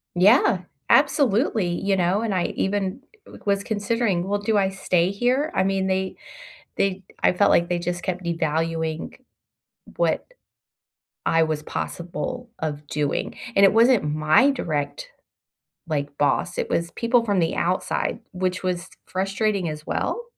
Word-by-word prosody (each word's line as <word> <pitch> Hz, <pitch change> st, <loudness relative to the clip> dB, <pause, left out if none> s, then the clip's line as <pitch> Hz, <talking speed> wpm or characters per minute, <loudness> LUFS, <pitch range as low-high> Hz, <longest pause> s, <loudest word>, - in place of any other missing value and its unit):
Yeah, 195 Hz, 0 st, +5 dB, 0.3 s
absolutely, 245 Hz, -, +3 dB
you 195 Hz, +3 st, 0 dB
know? 185 Hz, +3 st, +2 dB
And 220 Hz, -4 st, -1 dB
I 180 Hz, -, +1 dB
even 195 Hz, +4 st, -1 dB, 0.5 s
was 200 Hz, 0 st, +2 dB
considering, 205 Hz, -3 st, 0 dB
"Well, 205 Hz, 0 st, 0 dB
do 210 Hz, 0 st, +1 dB
I 190 Hz, -1 st, +3 dB
stay 185 Hz, -2 st, +1 dB
here?" 255 Hz, +10 st, 0 dB
I -, -, +3 dB
mean, 190 Hz, 0 st, 0 dB
they 190 Hz, 0 st, -1 dB, 0.6 s
they 195 Hz, -1 st, 0 dB, 0.2 s
I -, -, +5 dB
felt 200 Hz, +3 st, +3 dB
like 170 Hz, 0 st, +4 dB
they 175 Hz, -1 st, 0 dB
just 175 Hz, 0 st, -3 dB
kept 185 Hz, -1 st, -3 dB
devaluing 160 Hz, -1 st, -2 dB, 0.8 s
what -, -, +1 dB, 1.0 s
I 165 Hz, 0 st, +4 dB
was 155 Hz, -1 st, -2 dB
possible 175 Hz, -, -5 dB
of 150 Hz, -2 st, -4 dB
doing, 145 Hz, -1 st, -2 dB, 0.2 s
and 195 Hz, -, +5 dB
it 195 Hz, -, +5 dB
wasn't 235 Hz, 0 st, +5 dB
my 155 Hz, -, +4 dB
direct, 145 Hz, -, -3 dB, 0.8 s
like, 145 Hz, -2 st, -3 dB
boss, 160 Hz, +4 st, +1 dB
it -, -, -1 dB
was 170 Hz, 0 st, -1 dB
people 235 Hz, 0 st, +2 dB
from 205 Hz, -3 st, +1 dB
the 165 Hz, -2 st, +1 dB
outside, 180 Hz, +2 st, -1 dB
which 185 Hz, 0 st, -2 dB
was 180 Hz, 0 st, -2 dB, 0.2 s
frustrating 195 Hz, -1 st, -1 dB
as 150 Hz, 0 st, -7 dB
well 475 Hz, -, -2 dB
185 Hz, 145 wpm, -23 LUFS, 170-205 Hz, 1.0 s, Yeah